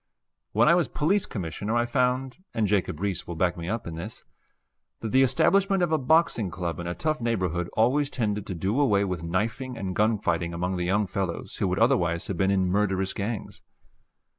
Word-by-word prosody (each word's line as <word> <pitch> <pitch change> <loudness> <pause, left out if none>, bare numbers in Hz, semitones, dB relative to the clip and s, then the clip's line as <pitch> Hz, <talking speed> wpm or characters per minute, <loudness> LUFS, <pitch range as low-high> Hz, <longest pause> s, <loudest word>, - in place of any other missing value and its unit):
When 115 +3 +4
I 170 - +7
was 175 -2 +3
Police 185 +7 +1
Commissioner 100 +4 -3
I 120 0 +2
found 125 +1 0 0.2
(and 110 - +2
Jacob 100 -6 0
Riis 100 -1 -2
will 85 - -5
back 90 +1 +1
me 85 0 -5
up 115 +1 -2
in 85 - -5
this) 90 +7 -7 0.8
that 110 - -3
the 130 - +5
establishment 195 - +3
of 170 - 0
a 160 - +2
boxing 135 - +2
club 85 -2 -4
in 85 - -4
a 85 - -3
tough 155 -2 -1
neighborhood 90 -7 -1
always 135 +6 +3
tended 105 -6 -2
to 95 - -4
do 100 - -1
away 105 -8 +3
with 90 -4 -3
knifing 115 +9 -2
and 95 -4 -4
gun 110 +1 +3
fighting 85 -3 -1
among 90 +2 -2
the 90 - -1
young 100 +4 +2
fellows 95 -2 -4
who - - 0
would 90 0 -1
otherwise 90 -9 +2
have 95 - -4
been 95 +2 +2
in 95 -1 +2
murderous 95 -1 +1
gangs. 105 +1 -4
105 Hz, 205 wpm, -26 LUFS, 90-125 Hz, 0.8 s, I